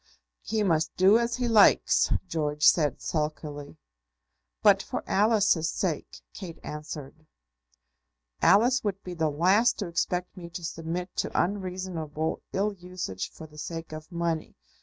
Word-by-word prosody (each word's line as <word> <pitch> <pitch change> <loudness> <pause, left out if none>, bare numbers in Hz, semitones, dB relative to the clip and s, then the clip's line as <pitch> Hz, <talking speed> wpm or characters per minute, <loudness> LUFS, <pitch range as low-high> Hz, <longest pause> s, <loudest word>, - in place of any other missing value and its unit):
"He 220 -1 -1
must 160 -4 +1
do 195 +5 +6
as 235 0 0
he 250 -1 -1
likes," 220 -3 +5 0.2
George 150 -3 -2
said, 150 -3 +4
sulkily. 150 - -4 0.9
"But - - +6
for - - -5
Alice's 205 -6 +3
sake!" 165 -4 -3
Kate 175 -5 -8
answered. 150 0 -8 1.1
"Alice 245 +6 +5
would 200 -2 -3
be 180 - -6
the 160 -2 0
last 185 +10 +3
to 200 - -3
expect 180 +2 -2
me 175 -3 -9
to 175 0 -8
submit 170 +2 -4
to - - -1
unreasonable 180 -5 -2
ill 205 +2 0
usage 180 - -5
for 160 - -11
the 150 -1 -13
sake 165 +1 -6
of 155 +2 -9
money. 170 -2 -2
170 Hz, 140 wpm, -27 LUFS, 155-195 Hz, 1.1 s, do